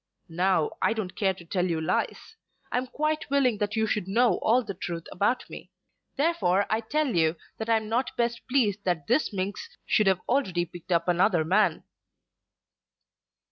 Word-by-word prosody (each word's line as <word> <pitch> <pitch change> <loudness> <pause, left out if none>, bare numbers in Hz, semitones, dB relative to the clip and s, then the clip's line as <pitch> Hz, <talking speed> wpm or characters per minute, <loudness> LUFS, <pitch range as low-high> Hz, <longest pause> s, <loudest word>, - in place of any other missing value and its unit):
Now 175 -1 +1
I - - +3
don't 215 -5 -5
care 190 -2 +1
to 175 - -13
tell 180 +1 0
you 165 -2 -1
lies. 160 - -2 0.4
I 250 - +2
am 255 - -5
quite 305 +3 -2
willing 260 -6 +2
that 210 +1 -1
you 220 0 +2
should 210 -3 -1
know 230 +5 +3
all 245 +3 +3
the 200 - -5
truth 170 -2 -5
about 220 +7 0
me. - - -10 0.5
Therefore 275 - +2
I 220 - +2
tell 290 +1 -1
you 160 -1 +3 0.2
that 220 +1 -4
I'm 220 -1 +2
not 235 +4 -1
best 235 0 0
pleased 215 -7 +1
that 175 -5 -1
this 305 - +1
minx 195 0 -5
should 215 - +2
have 190 -2 +3
already 190 -10 +1
picked 175 +1 -12
up 170 0 +2
another 175 -1 +3
man." 200 +6 +2
205 Hz, 180 wpm, -27 LUFS, 180-240 Hz, 0.5 s, I